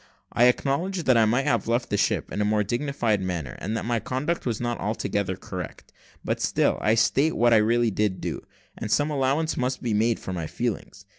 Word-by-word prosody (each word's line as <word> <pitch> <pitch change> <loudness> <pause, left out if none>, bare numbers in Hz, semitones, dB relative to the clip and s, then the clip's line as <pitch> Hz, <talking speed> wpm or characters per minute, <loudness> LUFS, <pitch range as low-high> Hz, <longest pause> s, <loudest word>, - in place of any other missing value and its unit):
I 120 - +5
acknowledge 160 +9 +1
that 130 - +4
I 115 -1 +5
might 125 +5 +1
have 115 -3 +1
left 120 +1 0
the - - +2
ship - - 0
in 105 - -2
a - - +3
more 105 0 +2
dignified 120 -2 0
manner, 85 -8 -4
and 110 +3 -3
that - - -4
my 120 0 0
conduct 130 +8 -2
was 115 -3 -1
not 120 -1 -2
altogether 100 -2 -2
correct; 90 -3 -8 0.3
but - - -1
still, - - +1
I 110 - +3
state 140 +7 +2
what 120 0 +4
I - - +7
really 115 +2 +2
did 105 -2 0
do, - - -4 0.3
and - - -5
some 145 +7 +2
allowance 145 +3 0
must 130 +1 -2
be 115 -3 0
made 110 +2 +2
for 95 - -6
my 85 -3 -3
feelings. 100 -2 -4
115 Hz, 215 wpm, -25 LUFS, 105-130 Hz, 0.3 s, I